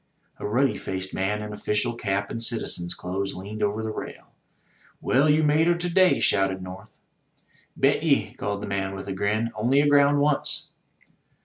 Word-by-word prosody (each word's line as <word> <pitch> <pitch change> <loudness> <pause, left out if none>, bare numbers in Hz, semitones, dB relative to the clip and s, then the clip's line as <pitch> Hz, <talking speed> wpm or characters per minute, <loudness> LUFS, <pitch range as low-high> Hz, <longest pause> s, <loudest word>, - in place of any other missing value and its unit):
A - - -3
ruddy 130 +6 +1
faced 95 0 -4
man 105 +3 -1
in 105 0 -6
official 105 +2 -1
cap 100 -3 -2
and 115 - -4
citizen's 110 -7 -1
clothes 95 +2 -4
leaned 100 +4 -7
over 105 +2 0
the 110 - -3
rail. - - -8 0.7
"Well, 140 +4 +2
you 155 +1 +4
made 150 +2 +3
her 175 - +4
to 175 0 -3
day/* 185 0 +5
shouted 95 -1 +2
North. 95 +1 -10 0.8
"Bet - - +3
ye," - - +1
called 100 0 -4
the - - -4
man 95 -1 -2
with 95 +1 -7
a 100 - -3
grin. 105 +4 -1
"Only 120 +5 +1
agroimd 145 0 +4
once." 145 0 0
105 Hz, 175 wpm, -25 LUFS, 95-140 Hz, 0.8 s, day